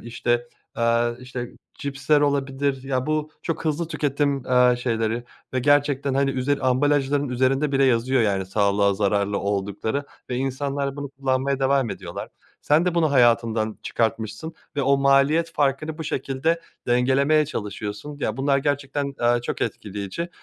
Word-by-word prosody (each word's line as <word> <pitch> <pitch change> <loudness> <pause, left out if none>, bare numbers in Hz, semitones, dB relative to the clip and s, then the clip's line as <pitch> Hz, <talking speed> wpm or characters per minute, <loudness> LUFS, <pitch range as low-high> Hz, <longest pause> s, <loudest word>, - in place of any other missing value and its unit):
işte, 120 +1 -1 0.3
ııı, 115 +1 +1 0.6
cipsler 140 +1 0
olabilir 140 -1 0
ya 130 -1 -2
bu 155 0 -1
çok 165 0 -3
hızlı 160 +1 -1
tüketim, 140 -3 0
ııı, 125 -1 +4
şeyleri 115 -1 -1 0.3
ve - - +2
gerçekten, 145 0 +2
hani, 135 0 +2
üzeri 135 +2 0
ambalajların 140 +1 +2
üzerinde 135 +3 +1
bile 135 0 +3
yazıyor, 130 0 +2
yani, 100 -3 0
sağlığa 100 0 +2
zararlı 100 0 +1
oldukları 100 +6 -2 0.3
ve 125 - -1
insanlar 140 +1 -2
bunu 145 0 -5
kullanmaya 135 0 -1
devam 135 -3 +2
ediyorlar. - - -6 0.4
Sen 150 +3 +4
de 180 -2 0
bunu 160 -3 +2
hayatından 115 -4 +2
çıkartmışsın 115 +6 -2 0.2
ve 140 - +1
o 140 +1 +4
maliyet 140 +4 +3
farkını 150 +2 0
bu 160 - -4
şekilde 140 +5 -1 0.3
dengelemeye 135 +5 +3
çalışıyorsun 105 +3 -5
ya - - -1
bunlar 140 +1 +2
gerçekten, 140 0 -2
ııı, 120 0 +3
çok 120 - -4
etkileyici. 105 - -4
135 Hz, 140 wpm, -23 LUFS, 120-145 Hz, 0.6 s, ııı